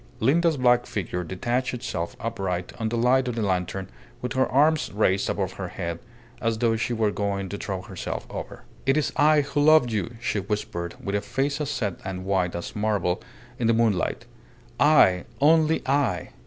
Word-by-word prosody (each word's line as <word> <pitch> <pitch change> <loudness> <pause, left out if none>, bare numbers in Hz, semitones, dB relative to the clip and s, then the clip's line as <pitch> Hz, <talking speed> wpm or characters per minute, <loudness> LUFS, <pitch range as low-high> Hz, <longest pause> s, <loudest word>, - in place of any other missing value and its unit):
Linda's 160 +6 +3
black 125 -1 +3
figure 90 -3 -3
detached 120 +9 -2
itself 85 -8 -4
upright 95 -6 -3
on 110 - 0
the 120 - -2
light 125 +2 +3
of 125 - -2
the 115 - -1
lantern 95 0 -1 0.3
with 125 - -4
her 130 0 +2
arms 150 +3 +3
raised 100 -2 +1
above 95 -2 -1
her 95 -1 -5
head 85 -2 -4 0.4
as 115 -1 0
though 115 0 +2
she 115 +2 -2
were 110 -3 +1
going 100 -2 -2
to 100 - -4
throw 95 -2 -4
herself - - -5
over. - - -7 0.2
"It 135 +2 +4
is 155 - +1
I 150 0 +5
who 145 +1 -1
loved 150 -5 +5
you," 110 +2 -2
she 115 -3 -1
whispered, 100 -3 -3
with 100 - -4
a 100 - +1
face 140 +7 -1
as 145 - -2
set 105 -10 -2
and 95 -1 -5
white 95 -3 0
as 85 - -6
marble 105 -4 0 0.4
in 115 - +1
the 115 - +4
moonlight. 110 -6 +1 0.5
"I! 135 - +5
Only 160 +2 +4
I! 130 - 0
110 Hz, 185 wpm, -25 LUFS, 95-130 Hz, 0.5 s, I